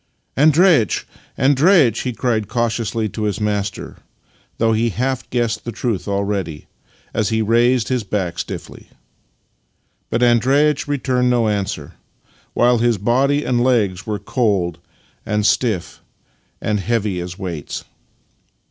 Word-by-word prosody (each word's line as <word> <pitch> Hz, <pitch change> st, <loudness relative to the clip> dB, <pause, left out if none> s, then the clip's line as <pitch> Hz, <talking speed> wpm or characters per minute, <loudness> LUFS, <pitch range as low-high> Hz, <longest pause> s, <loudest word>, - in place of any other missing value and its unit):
" -, -, -49 dB
Andreitch, 155 Hz, -, +4 dB, 0.3 s
Andreitch! 140 Hz, -, +4 dB
" -, -, -2 dB
he 125 Hz, -, -2 dB
cried 115 Hz, -3 st, -1 dB
cautiously 115 Hz, -1 st, -1 dB
to 110 Hz, -, -6 dB
his 105 Hz, +1 st, -1 dB
master 105 Hz, -1 st, -3 dB, 0.6 s
(though 115 Hz, 0 st, +2 dB
he 115 Hz, +2 st, +1 dB
half 130 Hz, +4 st, -2 dB
guessed 120 Hz, -2 st, -1 dB
the 120 Hz, -, -5 dB
truth 110 Hz, -3 st, -2 dB
aJready) 100 Hz, -5 st, -2 dB, 0.5 s
as 105 Hz, -2 st, 0 dB
he 110 Hz, -1 st, +1 dB
raised 120 Hz, +1 st, +2 dB
his 125 Hz, -3 st, 0 dB
back 95 Hz, -4 st, -3 dB
stiffly. -, -, -7 dB, 1.2 s
But 120 Hz, +2 st, 0 dB
Andreitch 135 Hz, +6 st, +3 dB
re 145 Hz, 0 st, 0 dB
turned 125 Hz, -1 st, +1 dB
no 120 Hz, -2 st, +2 dB
answer, 100 Hz, -2 st, -3 dB, 0.6 s
while 120 Hz, 0 st, +3 dB
his 120 Hz, -1 st, +2 dB
body 135 Hz, +8 st, +1 dB
and 120 Hz, -1 st, +1 dB
legs 105 Hz, -7 st, +1 dB
were 105 Hz, -1 st, -1 dB
cold 100 Hz, -5 st, -1 dB, 0.4 s
and 105 Hz, -1 st, -1 dB
stiff 105 Hz, -9 st, 0 dB, 0.6 s
and 105 Hz, -1 st, -1 dB
heavy 105 Hz, -3 st, -1 dB
as 90 Hz, 0 st, -7 dB
weights. 85 Hz, -6 st, -5 dB
115 Hz, 135 wpm, -19 LUFS, 105-125 Hz, 1.2 s, Andreitch